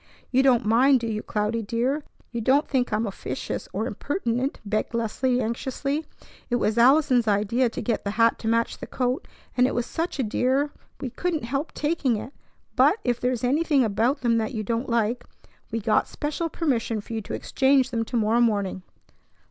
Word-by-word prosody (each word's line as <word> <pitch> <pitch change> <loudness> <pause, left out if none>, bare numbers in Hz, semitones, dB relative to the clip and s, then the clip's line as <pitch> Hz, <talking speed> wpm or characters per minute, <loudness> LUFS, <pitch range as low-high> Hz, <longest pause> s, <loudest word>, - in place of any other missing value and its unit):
"You 260 +1 +4
don't 250 -4 +4
mind, 255 +5 +5
do - - -3
you, 215 -1 -2
Cloudy, 210 +2 -1
dear? 245 +7 -1 0.3
You 235 - -3
don't 270 +6 +3
think 255 -3 0
I'm 215 +2 +1
officious 200 - -5
or - - -2
impertinent?" 250 -4 -2
begged 215 +3 -1
Leslie 245 +3 0
anxiously. 265 +6 -2 0.4
"It 245 - +1
was 225 -1 +1
Allison's 255 -2 +5
idea 215 +5 +2
to - - -5
get 235 -3 -1
the 200 - -2
hat 230 0 +4
to 225 - -5
match 230 +1 +1
the - - -7
coat, 255 +1 -1 0.3
and 250 0 +4
it - - -3
was 240 - 0
such 330 0 -3
a 265 - 0
dear 260 +6 +1 0.3
we 255 - -4
couldn't 345 -1 -2
help 275 +6 -2
taking 295 -5 0
it; 255 +6 -7 0.4
but, - - +5
if 245 -1 0
there 250 - +1
is 245 -2 -3
anything 285 +1 +3
about 230 +6 +1
them 230 -2 +2
you 220 -5 -4
don't 230 +4 -2
like, 235 +1 0 0.5
we 230 - -1
got 215 0 +2
special 305 +3 -3
permission 240 -9 -1
for 210 - -8
you 220 - -2
to - - -5
exchange 265 -1 +2
them 230 -1 0
to 240 - -2
morrow 225 +2 +3
morning." 200 -5 +1
240 Hz, 190 wpm, -25 LUFS, 225-270 Hz, 0.5 s, mind